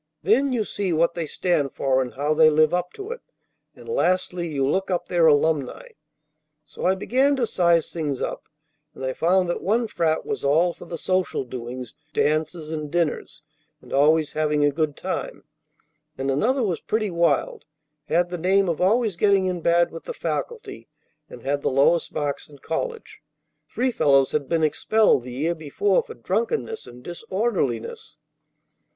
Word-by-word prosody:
Then 250 - +3
you 235 -4 0
see 200 -2 -3
what 170 +1 +2
they 170 -2 -3
stand 150 -5 0
for, 130 -1 +1
and 125 -2 -5
how 145 +3 0
they 155 0 +6
live 155 +1 +3
up 180 0 -1
to 405 +3 -7
it; 485 - -6 0.5
and - - -14
lastly 185 - 0
you 140 -4 -1
look 190 +7 0
up 180 -2 -1
their 170 -2 +3
alumni.' 155 - +1 0.8
So - - -7
I 185 +1 +3
began 260 +8 +2
to 255 -3 +1
size 170 -6 +2
things 150 -6 -2
up, - - -4 0.5
and 130 - -6
I 130 - -1
found 180 +4 +2
that 175 - -2
one 225 +4 +1
frat 160 -5 0
was - - -4
all 160 +5 +3
for - - -12
the 170 - -6
social 185 -3 -1
doings, 125 -1 -7 0.2
dances, 155 +2 0
and 155 -2 -4
dinners, 170 -2 -2 0.4
and - - -12
always 150 +2 +3
having 150 -1 +1
a 145 - +3
good 150 0 -1
time; 185 - -4 0.7
and 135 +1 -1
another 245 - +1
was 185 -6 -1
pretty 215 -2 -1
wild, 170 -4 0 0.4
had 175 +3 +1
the 180 - -4
name 195 +3 +3
of 165 - -2
always 215 +1 +2
getting 195 +1 +3
in 180 -2 -2
bad 170 +1 +3
with 165 - -9
the - - -6
faculty, 475 -2 -5 0.4
and - - -12
had 140 +1 -1
the - - 0
lowest 140 +6 +2
marks 145 -1 -3
in 145 - -14
college; 455 - -5 0.5
three 255 +1 0
fellows 140 - +3
had 145 -3 -2
been 165 -1 +1
expelled 210 - +3
the 125 - -8
year 150 +7 -1
before 170 - 0
for 480 - -11
drunkenness 460 -1 -2
and 125 +1 -13
disorderliness. 180 - -3
170 Hz, 175 wpm, -23 LUFS, 145-195 Hz, 0.8 s, they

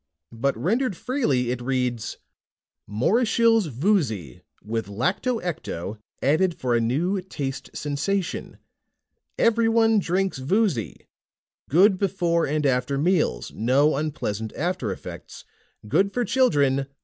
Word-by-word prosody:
But 130 +2 -1
rendered 210 - 0
freely, 145 - 0
it 125 -1 -3
reads: 125 -3 -2 0.7
MORISHILLE'S 225 - +2
VOOZY, 130 - -1 0.2
WITH 110 +1 -3
LACTO 185 - 0
ECTO 110 - -5 0.2
ADDED 165 +6 +2
FOR 125 -2 -1
A 115 - +2
NEW 170 - 0
TASTE 140 -7 -5
SENSATION. 150 +7 -2 0.8
EVERYONE 225 -1 +3
DRINKS 190 -3 -1
VOOZY. 155 - -1 0.6
GOOD 185 +5 +5
BEFORE 175 -4 +1
AND 150 +1 -1
AFTER 130 +1 +1
MEALS, 155 - +1
NO 135 +7 +2
UNPLEASANT 110 -8 -3
AFTER 155 - -2
EFFECTS. 95 - -9 0.4
GOOD 195 - +2
FOR 245 -1 +1
CHILDREN! 140 - +2
150 Hz, 110 wpm, -24 LUFS, 125-195 Hz, 0.8 s, GOOD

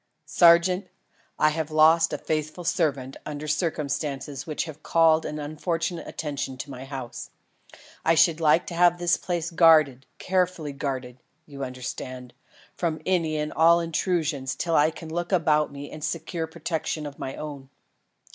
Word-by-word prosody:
"Sergeant, 175 +2 +4 0.5
I 155 - +4
have 155 0 -3
lost 160 +1 +5
a - - -2
faithful 155 +2 -3
servant 140 -6 -1
under 150 0 -6
circumstances 145 -3 -2
which 155 - -2
have 155 -1 -9
called 160 0 +3
an 150 - -5
unfortunate 165 +3 -3
attention 140 -3 -4
to 140 +2 -7
my 130 0 -8
house. 135 -3 -7 0.7
I 165 - +3
should 160 0 +4
like 160 +2 +4
to - - -7
have 175 0 +4
this 175 0 +2
place 175 -2 -3
guarded 155 -6 +5
carefully 180 -5 -1
guarded, 130 -3 -4 0.3
you 140 -2 -8
understand 125 0 -6 0.4
from 165 -3 -2
any 165 -4 +1
and 150 0 -3
all 170 +1 +5
intrusion 165 -4 -1
till 165 +5 -1
I 150 +2 +5
can 160 0 -9
look 175 +2 -3
about 155 -5 +2
me 140 0 -8
and 155 - -9
secure 165 +1 -3
protection 160 -1 -3
of 145 -1 -8
my 130 - -5
own. 140 -3 -8
155 Hz, 155 wpm, -25 LUFS, 140-170 Hz, 0.7 s, lost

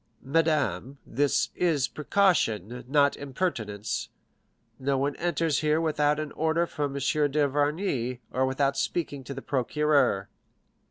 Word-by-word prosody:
"Madame, 145 -2 0
this 140 +3 +1
is 155 -7 +1
precaution, 125 - +1
not 140 +1 +3
impertinence; 120 - -3 0.7
no 135 +1 0
one 140 +1 0
enters 165 -3 0
here 155 0 +2
without 150 -2 +1
an 155 -2 -4
order 160 +2 +1
from 145 -4 -3
M. - - -2 0.3
d'Avrigny, 145 -2 0
or 130 +1 +1
without 135 +1 +1
speaking 140 -1 -2
to 140 +2 -7
the 135 - -7
procureur." 135 -6 +1
145 Hz, 120 wpm, -27 LUFS, 130-155 Hz, 0.7 s, not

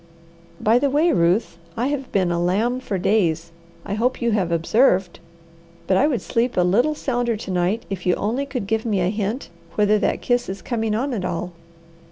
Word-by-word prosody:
By 225 +3 +3
the 280 - +1
way, 305 +5 +3
Ruth, 175 - +1 0.2
I 245 +4 0
have 275 -3 -4
been 185 -3 +1
a 170 0 0
lamb 215 +8 +1
for 205 -6 -3
days. 170 -4 +1 0.3
I 200 - -3
hope 245 +5 0
you 235 -1 +1
have 190 -5 0
observed! 180 +2 +2 0.7
But 185 - +2
I 275 - +4
would 265 -7 -1
sleep 235 -1 -1
a - - +5
little 235 +12 +2
sounder 245 -5 -1
to 205 - -6
night 180 +5 0
if 190 -2 -5
you 180 - +4
only 245 +7 -2
could 255 -7 -4
give 220 +2 -1
me 210 -4 0
a 180 - +1
hint 215 +4 -3 0.3
whether 210 0 +3
that - - -1
kiss 245 -2 +1
is 195 - -6
coming 225 -3 -1
on 260 +4 -1
at 205 -6 -3
all." 180 0 -3
215 Hz, 205 wpm, -22 LUFS, 185-245 Hz, 0.7 s, a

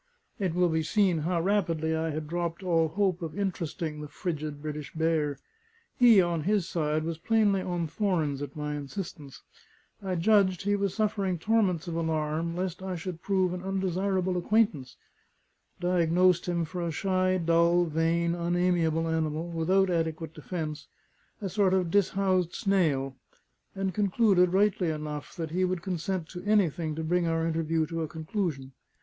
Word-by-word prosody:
It 185 -4 -1
will 180 -1 +3
be 160 0 +1
seen 180 +1 +2
how 170 +2 0
rapidly 165 -5 +1
I 160 0 -1
had 155 0 -4
dropped 170 +2 -3
all 165 -3 +2
hope 185 +1 0
of 165 0 -5
interesting 165 -5 -3
the 150 - -6
frigid 150 -1 -4
British 150 -1 -6
bear. 155 -3 +1 0.6
He, 235 -5 +7
on 175 -3 +1
his 195 +1 +1
side, 155 -2 -1
was 165 0 -4
plainly 210 -1 +2
on 175 -2 -2
thorns 160 -6 -1
at 140 -1 -6
my 150 -1 -3
insistence; 145 -2 -7 0.6
I 190 -2 -2
judged 185 0 +3
he 205 +1 +2
was 200 -2 -1
suffering 200 -4 0
torments 185 -3 +1
of 170 - -3
alarm 160 0 -1
lest 180 0 -3
I 190 -1 -3
should 175 0 -6
prove 185 -2 +1
an 180 - -5
undesirable 190 -1 -1
acquaintance; 180 - +1 0.8
diagnosed 180 0 +3
him 170 -1 0
for 175 +3 -5
a 170 - -1
shy, 185 +2 +1
dull, 170 +1 +3
vain, 165 +1 +1
unamiable 170 -2 +1
animal, 160 0 -1
without 185 +3 +2
adequate 160 -1 -2
defence 155 -4 -5 0.5
a 200 - -2
sort 190 0 +2
of 180 -3 0
dishoused 190 -2 +1
snail; 150 -9 +1 0.6
and 195 -1 -2
concluded, 195 -2 +3
rightly 190 -2 +2
enough, 150 -1 -5
that 160 -2 -4
he 185 +2 0
would 185 -2 -1
consent 185 -2 -2
to 180 - -7
anything 175 -7 +1
to 160 - -3
bring 175 +2 +1
our 165 0 0
interview 165 -1 0
to 165 +2 -4
a 160 - -2
conclusion. 155 -3 -3
170 Hz, 160 wpm, -28 LUFS, 160-190 Hz, 0.8 s, He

